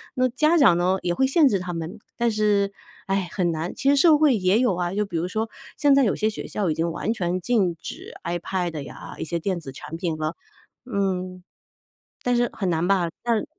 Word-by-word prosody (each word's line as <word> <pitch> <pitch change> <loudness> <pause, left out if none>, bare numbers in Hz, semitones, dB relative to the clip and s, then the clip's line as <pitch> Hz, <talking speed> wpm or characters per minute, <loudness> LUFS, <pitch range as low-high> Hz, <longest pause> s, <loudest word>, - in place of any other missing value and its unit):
那 255 0 +3
家 305 +7 +3
长 225 - +6
呢， 180 +2 +2
也 175 - +1
会 265 - +2
限 285 +3 +5
制 205 -7 +2
他 180 -1 -5
们， 165 +5 -5 0.2
但 235 -1 +2
是， 210 -2 +2 0.4
唉， 195 -2 0
很 180 -3 0
难。 160 +3 -3
其 275 - 0
实 285 - +5
社 305 +1 +6
会 295 -4 +4
也 195 +2 +2
有 245 -7 +2
啊， 175 0 -2
就 210 +1 0
比 185 -4 -8
如 165 - -1
说， 220 +4 -2 0.3
现 285 -2 +5
在 275 - +5
有 210 - +2
些 215 - 0
学 215 - -6
校 200 -4 -2
已 155 - +2
经 165 +2 -1
完 215 +7 -1
全 180 -4 -1
禁 190 -5 +1
止 - - -8
iPad 175 -2 -2
呀， 140 - -9
一 - - -4
些 170 +1 -2
电 185 +2 -1
子 135 - -8
产 155 +4 -8
品 165 -2 -2
了。 155 +2 -2 0.5
嗯。 185 -5 -2 0.8
但 245 0 +2
是 240 -1 +2
很 190 -3 -2
难 165 0 +1
吧， 190 -3 +2 0.2
但 230 -2 +1
190 Hz, 250 characters per minute, -24 LUFS, 175-235 Hz, 0.8 s, 长